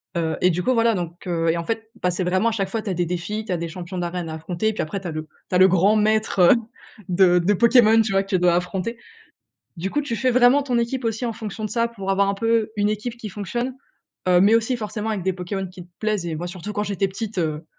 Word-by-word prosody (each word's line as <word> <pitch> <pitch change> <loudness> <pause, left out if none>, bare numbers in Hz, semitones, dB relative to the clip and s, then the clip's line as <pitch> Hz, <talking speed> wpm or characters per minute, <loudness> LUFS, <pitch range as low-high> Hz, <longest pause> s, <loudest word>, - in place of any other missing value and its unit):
Heu 165 -2 -1
et 180 - +4
du 175 +2 -1
coup, 255 +8 +1
voilà 230 0 +3
donc 175 -3 -5
heu 165 -2 0
et 165 - +1
en 170 - -3
fait, 225 +4 -4
bah, 180 - +2
c'est 180 +1 0
vraiment 185 +5 +2
à - - -2
chaque 195 -3 -2
fois, 220 +2 -3
tu 210 - -4
as - - 0
des 175 0 0
défis, 180 +5 -3
tu 200 - -5
as 180 - +1
des 170 0 -4
champions 180 +2 -7
d'arène 175 -1 -3
à 160 - -5
affronter, 175 +7 -2
puis - - -2
après 195 +6 -4
tu 185 - -6
as - - -3
le 155 0 -4 0.3
tu - - -1
as - - +6
le 185 +1 +7
grand 190 +3 +3
maître, 215 -1 +2
heu, 175 - +7 0.6
de 180 -1 +4
de 185 +4 +2
Pokémon, 230 0 +5
tu 220 - -1
vois, 195 0 +3
que - - -17
tu 190 - +2
dois 175 -1 +4
affronter. 185 +6 -2 0.8
Du 180 +4 -2
coup, 295 - 0
tu 280 -5 -3
fais 255 +3 +1
vraiment 250 +3 +5
ton 255 -3 -1
équipe 235 +2 -2
aussi 225 +1 -2
en 235 - -1
fonction 220 -1 -6
de 215 - -3
ça 235 -1 +1
pour 195 -4 -5
avoir 195 +1 +2
un 200 - +1
peu 225 +1 +1
une 205 +1 +2
équipe 220 +3 -4
qui 220 -3 -7
fonctionne, 240 +6 -3 0.5
heu, 180 -1 +5
mais 205 +3 +5
aussi 230 +2 +2
forcément 215 0 -4
avec 210 -4 -2
des 190 +2 0
Pokémon 190 +2 -4
qui 180 -1 -11
te 180 - -33
plaisent 215 -5 -1
et 165 -2 -3
moi, 175 +3 -4
surtout 185 +3 -6
quand 205 - 0
j'étais 200 -1 -1
petite, 205 +1 -5
heu, 155 -2 -2
195 Hz, 285 wpm, -22 LUFS, 180-225 Hz, 0.8 s, le